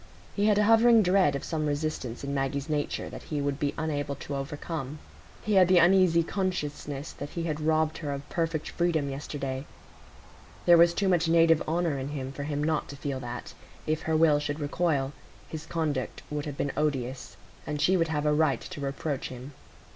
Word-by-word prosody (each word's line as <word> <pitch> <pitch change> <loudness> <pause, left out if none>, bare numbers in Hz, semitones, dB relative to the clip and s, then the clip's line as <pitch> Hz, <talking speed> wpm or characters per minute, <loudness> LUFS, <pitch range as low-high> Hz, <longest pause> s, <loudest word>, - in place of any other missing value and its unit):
He 205 +1 +2
had 210 -1 +4
a 210 - +4
hovering 225 +1 +6
dread 180 -5 +3
of 140 - -4
some 155 -2 -2
resistance 145 -5 -3
in 140 0 -3
Maggie's 140 +1 -1
nature 150 -2 -2
that - - -8
he 150 - -1
would 140 0 -1
be 145 0 -1
unable 145 -2 -2
to 140 +1 -6
overcome. 145 0 -5 0.5
He 215 - 0
had 185 -2 +6
the 185 0 +5
uneasy 175 -1 +5
consciousness 150 -6 -3
that 145 - -7
he 170 - -4
had 155 -2 -2
robbed 155 0 +1
her 145 -3 -3
of 140 +1 -5
perfect 165 -2 -2
freedom 160 -5 0
yesterday; 135 -1 -4 1.0
there 175 - +8
was 170 0 +6
too 200 - +1
much 175 -3 +3
native 165 -1 +5
honour 165 -3 0
in 135 - -4
him, 135 -2 -4
for 140 +1 -6
him 145 0 -2
not 155 0 0
to 140 - -7
feel 140 -1 -4
that, 120 -1 -7 0.3
if 155 0 0
her 160 0 +1
will 155 -2 +5
should 145 +1 -3
recoil, 145 -2 0 0.3
his 160 0 -7
conduct 155 -6 -2
would 150 0 -3
have 145 -1 -6
been 140 - -1
odious, 135 -4 -2 0.3
and 150 -1 -2
she 185 +5 +3
would 165 -2 +2
have 150 -1 -1
a 150 - +3
right 150 -5 +2
to 145 - -8
reproach 140 +1 -3
him. 130 +3 -9
150 Hz, 200 wpm, -28 LUFS, 140-165 Hz, 1.0 s, there